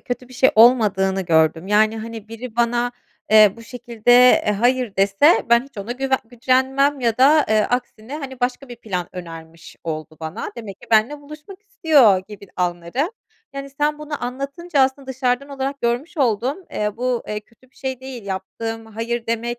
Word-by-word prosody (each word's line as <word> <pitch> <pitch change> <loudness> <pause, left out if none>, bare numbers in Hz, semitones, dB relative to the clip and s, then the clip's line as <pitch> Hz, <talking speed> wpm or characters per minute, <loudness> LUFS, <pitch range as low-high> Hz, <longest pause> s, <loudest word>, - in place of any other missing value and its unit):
kötü 245 0 -6
bir 255 - -14
şey 260 +1 +4
olmadığını 210 -5 +4
gördüm. 160 0 +2
Yani, 215 +2 +2
hani, 225 -1 -8
biri 230 +1 -9
bana, 240 +1 +1 0.4
eee, 215 -2 +7
bu 230 - -12
şekilde, 240 -1 -3 0.4
eee, 210 - +3
hayır 245 0 0
dese 200 - +3
ben 235 +2 +5
hiç 275 -6 -14
ona 215 +5 -4
güve 265 +1 -1
gücenmem 260 +4 +1
ya 230 -1 0
da, 295 +3 +5
eee, 215 0 +3
aksine, 245 +1 -3
hani, 265 -4 -8
başka 250 +2 -2
bir 240 - -9
plan 185 -6 -4
önermiş 165 -2 -10
oldu 155 -1 -5
bana, 160 +1 -5
demek 205 -4 -9
ki - - -14
benimle 225 +7 +2
buluşmak 305 +7 -12
istiyor 300 - +4
gibi 200 -1 -11
anlarım. 175 - -1 0.5
Yani 275 0 -6
sen 295 +2 -1
bunu 295 -4 -5
anlatınca 280 +5 -3
aslında 265 +1 +1
dışarıdan 260 +1 -1
olarak 275 0 -4
görmüş 240 +8 -2
oldum. 255 - 0
Eee, 210 0 -3
bu, 250 -1 -1
eee, 210 0 -3
kötü 240 +4 -27
bir - - -33
şey 260 -1 -5
değil. 260 -5 -8
Yaptığım 225 +4 -5
hayır 230 +2 -4
demek, 235 +1 -2
240 Hz, 175 wpm, -21 LUFS, 210-265 Hz, 0.5 s, eee